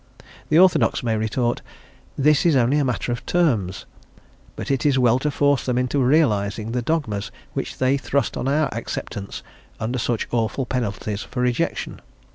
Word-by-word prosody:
The 155 - +4
orthodox 180 -6 +4
may 115 -2 +1
retort, 115 +3 -1 0.6
"this 150 +1 +4
is 165 -4 +4
only 130 +3 +3
a - - +2
matter 125 -1 -1
of 120 - -3
terms;" 115 - +1 0.7
but - - -4
it 135 - 0
is 145 -3 +3
well 125 -1 +4
to 150 - 0
force 145 -1 +2
them 125 -1 -1
into 125 +3 0
realising 115 -6 +2
the 125 +1 -1
dogmas 115 -8 -1 0.2
which - - -4
they 130 +2 +2
thrust 140 -1 -1
on - - -2
our 150 +2 +2
acceptance 105 -3 -5 0.4
under 120 +3 -2
such 115 -1 -1
awful 120 +3 0
penalties 110 -4 -3
for 125 - -4
rejection. 125 -1 -1
125 Hz, 165 wpm, -22 LUFS, 115-140 Hz, 0.7 s, The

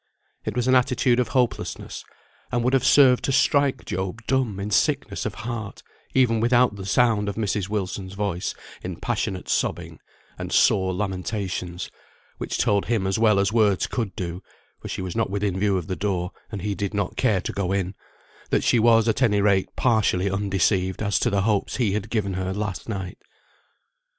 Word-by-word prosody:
It 110 - -3
was 125 0 0
an 130 - +4
attitude 125 -1 +3
of 125 - +1
hopelessness, 125 -3 -2 0.5
and 120 -1 0
would 125 +2 +1
have 135 - +3
served 130 -3 +5
to - - 0
strike 140 -1 +2
Job 95 +5 -4
dumb 125 -7 0
in 100 +2 -4
sickness 95 - +1
of - - -6
heart, 115 -4 -5 0.3
even 120 -4 +3
without 120 -1 +3
the 95 -1 -7
sound 110 -3 +2
of 100 - -4
Mrs. 105 -3 -1
Wilson's 95 -2 -3
voice 100 -4 -2 0.3
in - - -5
passionate 95 -1 -3
sobbing, - - -2 0.4
and - - -5
sore 95 -1 +3
lamentations, 95 -2 -3 0.5
which - - -3
told 100 -1 +2
him 110 -5 0
as 95 +2 0
well 110 -3 +4
as 100 +2 +1
words 105 -5 +3
could 110 -7 -3
do 90 0 -4 0.4
(for - - -8
she - - -4
was 90 -2 -5
not 115 -3 0
within 100 -1 -1
view 100 -1 +2
of 90 - -3
the 95 - -3
door, 95 -3 -2 0.2
and 100 -4 -5
he 105 -1 -1
did 100 +1 -3
not 100 -3 -1
care 110 -7 +2
to - - -4
go 95 -2 -2
in), 95 -1 -1 0.6
that - - +1
she 120 - +3
was 115 0 +5
at 115 +3 +1
any 105 -5 +3
rate 100 -2 +2
partially 105 -5 +2
undeceived 95 -1 0
as 100 -1 +1
to - - +1
the 100 -1 +1
hopes 105 -2 0
he 115 -6 +1
had 105 +1 -3
given 105 -4 -1
her 95 0 -2
last 105 0 -4
night. 95 -4 -5
100 Hz, 190 wpm, -24 LUFS, 95-115 Hz, 0.6 s, served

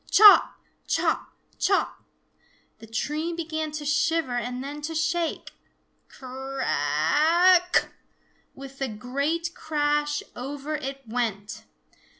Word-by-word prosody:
Chop, 420 0 +8 0.3
chop, - - 0 0.3
chop! 390 - +1 0.8
The 225 - -12
tree 300 +9 -2
began 315 -2 -3
to 305 -1 -5
shiver 295 -1 +1
and 250 +1 -3
then 290 +2 -7
to 325 +2 -5
shake. 325 +1 -1 0.6
Cra 265 +1 -6
a 305 - +4
ck! - - +2 0.6
With 275 0 -11
a 270 - 0
great 280 +10 -2
crash 295 -1 -1
over 280 +4 -5
it 275 -2 -6
went! 220 -3 -3
290 Hz, 110 wpm, -25 LUFS, 255-315 Hz, 0.8 s, Chop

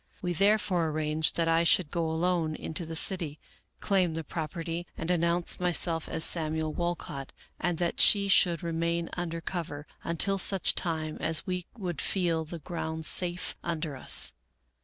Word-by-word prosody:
We 175 -1 0
therefore 195 -2 +2
arranged 155 0 0
that 165 -1 +1
I 165 0 +3
should 175 -3 +3
go 165 -2 -1
alone 165 -1 0
into 160 +2 -5
the 165 - -5
city, 160 -3 +1 0.4
claim 185 -5 +1
the 165 - 0
property, 165 +2 -4
and 165 +2 -2
announce 170 0 +2
my 180 -1 +1
self 165 -1 +2
as 160 - +3
Samuel 155 -1 +1
Walcott, 165 -5 -4 0.3
and 175 -2 0
that 170 0 -1
she 200 -1 +5
should 175 -4 +4
remain 170 0 -1
under 165 -2 -3
cover 160 -4 -4 0.2
until 195 +4 0
such 190 0 +3
time 160 -3 -2
as 160 -1 -1
we 180 -1 -3
would 180 -7 -3
feel 170 -4 0
the 170 +2 -7
ground 160 -1 -5
safe 175 +1 +1
un 170 -2 -2
der 150 -3 -4
us. 130 - +2
170 Hz, 165 wpm, -29 LUFS, 160-175 Hz, 0.4 s, she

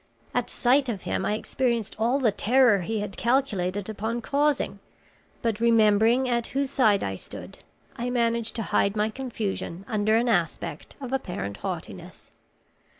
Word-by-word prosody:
At - - 0
sight 260 +2 +2
of 205 -5 -4
him - - -1
I 210 - +1
experienced 235 -1 -1
all 235 +4 +2
the 250 -6 +2
terror 235 0 +4
he 215 +4 -2
had 200 -2 -5
calculated 205 -7 0
upon 220 +2 -3
causing, 285 +4 0 0.6
but 225 -2 0
remembering 230 +2 +4
at 235 -2 0
whose 275 -1 0
side 215 -8 +3
I 95 - -2
stood, 95 - -8 0.4
I 240 +1 -2
managed 235 -2 0
to 225 - -2
hide 200 0 +1
my 215 +1 +1
confusion 210 -7 -4
under 215 +1 +2
an 240 +2 +1
aspect 170 -6 -1
of 265 -2 -6
apparent 175 - -3
haughtiness. - - -7
225 Hz, 150 wpm, -26 LUFS, 205-245 Hz, 0.6 s, terror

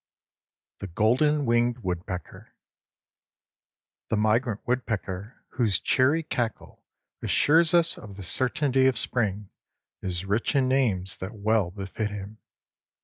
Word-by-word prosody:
XIV - - -68
THE 100 - -5
GOLDEN 130 - +2
WINGED 120 +1 +2
WOODPECKER 90 0 -6 1.5
The 110 - +1
migrant 110 +1 +1
woodpecker 110 -4 -3
whose 110 -7 +1
cheery 145 - +2
cackle 120 -7 -4 0.4
assures 160 +3 +4
us 170 -1 +3
of 100 -2 -11
the 100 - -7
certainty 130 - +2
of 130 -3 +1
spring 105 -5 -2 0.5
is 90 -1 -3
rich 105 +8 0
in 135 -2 +3
names 110 -9 0
that 95 +4 -7
well 105 -2 +1
befit 100 +3 -4
him. 105 +1 -8
110 Hz, 120 wpm, -26 LUFS, 100-130 Hz, 1.5 s, assures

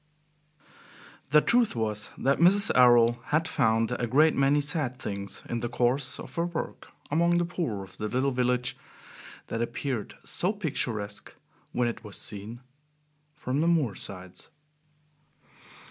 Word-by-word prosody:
X - - -32 0.6
The 150 +1 +6
truth 235 - +2
was 105 -2 -2
that 140 +1 +1
Mrs. 195 +4 +5
Errol 120 -1 +6
had 160 +2 +1
found 115 -3 +2
a 120 - 0
great 150 +6 +4
many 140 +2 +3
sad 145 -3 -2
things 100 -4 -5
in 120 - -2
the 120 0 -3
course 125 +2 0
of - - -9
her 170 - +1
work 170 -2 -5 0.2
among 170 +3 +3
the 175 - +2
poor 155 - -3
of 95 - -14
the 105 - -3
little 130 +4 0
village 125 0 0 0.7
that 115 - -3
appeared 120 -1 -3
so 185 +4 0
picturesque 120 - -3 0.4
when 120 -1 +1
it 120 0 -4
was 105 -3 -7
seen 110 +3 -5 0.7
from 130 +4 -2
the 165 - +2
moor 155 -10 +2
sides. 90 -1 -9
125 Hz, 145 wpm, -28 LUFS, 115-150 Hz, 0.7 s, The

